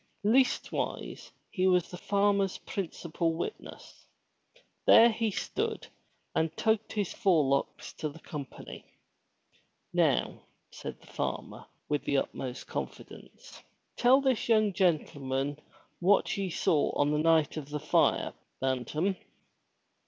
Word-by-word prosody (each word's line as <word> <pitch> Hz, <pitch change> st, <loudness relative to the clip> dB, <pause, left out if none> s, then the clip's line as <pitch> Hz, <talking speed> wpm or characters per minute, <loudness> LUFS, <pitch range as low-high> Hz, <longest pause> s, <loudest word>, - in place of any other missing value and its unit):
Leastwise, 255 Hz, +4 st, 0 dB, 0.2 s
he 185 Hz, -1 st, +1 dB
was 180 Hz, -2 st, +2 dB
the 180 Hz, -, -6 dB
farmer's 200 Hz, -1 st, +1 dB
principal 170 Hz, -3 st, -3 dB
witness. 170 Hz, -, -7 dB, 0.8 s
There 235 Hz, +1 st, +8 dB
he 225 Hz, 0 st, 0 dB
stood 200 Hz, -, -3 dB, 0.5 s
and 160 Hz, 0 st, 0 dB
tugged 220 Hz, -1 st, +1 dB
his 205 Hz, -4 st, -1 dB
forelocks 155 Hz, -, +1 dB
to 155 Hz, -, -2 dB
the 145 Hz, -, -12 dB
company. 150 Hz, -5 st, -8 dB, 1.1 s
"Now," -, -, +1 dB, 0.3 s
said -, -, -8 dB
the -, -, -18 dB
farmer, -, -, -5 dB, 0.2 s
with 150 Hz, -1 st, -1 dB
the 140 Hz, -, +1 dB
utmost 130 Hz, -1 st, -3 dB
confidence. -, -, -8 dB, 0.3 s
'*Tell 255 Hz, +3 st, +5 dB
this 260 Hz, -4 st, 0 dB
young 215 Hz, -3 st, +4 dB
gentleman 145 Hz, -6 st, 0 dB, 0.4 s
what 190 Hz, +3 st, +3 dB
ye 195 Hz, -1 st, -2 dB
saw 155 Hz, -2 st, +2 dB
on 145 Hz, 0 st, +2 dB
the 150 Hz, -, +1 dB
night 160 Hz, -2 st, +3 dB
of 150 Hz, -3 st, -6 dB
the 150 Hz, 0 st, -3 dB
fire. -, -, +2 dB, 0.3 s
Bantam.' 135 Hz, -, -1 dB
170 Hz, 115 wpm, -30 LUFS, 150-205 Hz, 1.1 s, There